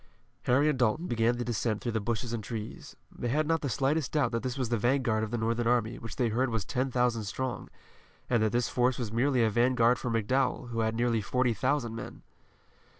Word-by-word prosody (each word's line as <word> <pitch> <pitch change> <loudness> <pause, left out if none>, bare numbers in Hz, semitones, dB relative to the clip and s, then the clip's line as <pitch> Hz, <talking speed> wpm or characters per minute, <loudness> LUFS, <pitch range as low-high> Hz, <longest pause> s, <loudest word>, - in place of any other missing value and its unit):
Harry 140 +5 +4
and 150 -4 +1
Dalton 125 +8 +1
began 120 -3 +1
the 120 - -3
descent 115 -2 -1
through 120 - -3
the 110 - 0
bushes 115 +2 -2
and 115 -2 -3
trees. 110 +1 -7 0.2
They 120 - -5
had 150 +6 +1
not 165 +1 +1
the 140 - -2
slightest 135 +5 0
doubt 140 -6 +2
that 115 -1 -1
this 130 0 -3
was 130 -4 -1
the 120 - +1
vanguard 120 -2 +1
of 110 - -3
the 120 - -2
Northern 115 +1 0
army 120 -1 +1
which 115 -3 -7
they 120 -2 +1
heard 125 +4 +1
was 115 -4 -2
ten 130 +2 -1
thousand 125 -3 +1
strong, 130 +5 -4 0.6
and 120 -3 +2
that 110 -1 +2
this 120 0 +1
force 125 +1 +1
was 120 -5 -3
merely 125 +1 +2
a 110 - +3
vanguard 120 +1 +3
for 125 - -3
McDowell, 125 +3 0
who 115 -1 -3
had 110 0 0
nearly 115 -1 +1
forty 125 +2 +1
thousand 120 +2 0
men. - - -8
120 Hz, 225 wpm, -29 LUFS, 115-130 Hz, 0.6 s, Harry